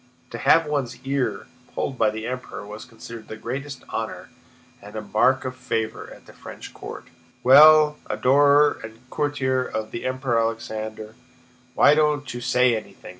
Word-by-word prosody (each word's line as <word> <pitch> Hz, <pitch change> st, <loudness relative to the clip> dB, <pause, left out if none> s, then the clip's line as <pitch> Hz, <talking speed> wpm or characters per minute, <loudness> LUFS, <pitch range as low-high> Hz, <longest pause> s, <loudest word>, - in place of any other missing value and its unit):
To 115 Hz, -, -6 dB
have 165 Hz, 0 st, +4 dB
one's 140 Hz, -5 st, -3 dB
ear 135 Hz, 0 st, -2 dB, 0.3 s
pulled 130 Hz, -, -3 dB
by 110 Hz, -, +4 dB
the 110 Hz, +1 st, -6 dB
Emperor 125 Hz, -4 st, -6 dB
was 105 Hz, +3 st, -9 dB
considered 115 Hz, -2 st, -11 dB
the 110 Hz, -, -8 dB
greatest 135 Hz, +4 st, -6 dB
honor -, -, -5 dB, 0.5 s
and 105 Hz, +1 st, -12 dB, 0.2 s
mark 130 Hz, +5 st, +3 dB
of 130 Hz, 0 st, -4 dB
favor 115 Hz, -4 st, -4 dB
at -, -, -14 dB
the -, -, -15 dB
French -, -, -11 dB
court. -, -, -9 dB, 0.4 s
"Well, 150 Hz, +3 st, +7 dB
adorer 145 Hz, +2 st, +4 dB
and 110 Hz, +3 st, -12 dB
courtier 130 Hz, -3 st, 0 dB
of 110 Hz, -3 st, -5 dB
the 120 Hz, -, -6 dB
Emperor 130 Hz, -2 st, 0 dB
Alexander, 110 Hz, -1 st, -4 dB, 0.6 s
why 145 Hz, -, +6 dB
don't 150 Hz, -2 st, +1 dB
you 120 Hz, -, -6 dB
say 125 Hz, 0 st, +3 dB
anything?" 110 Hz, -, -9 dB
125 Hz, 155 wpm, -23 LUFS, 110-140 Hz, 0.6 s, Well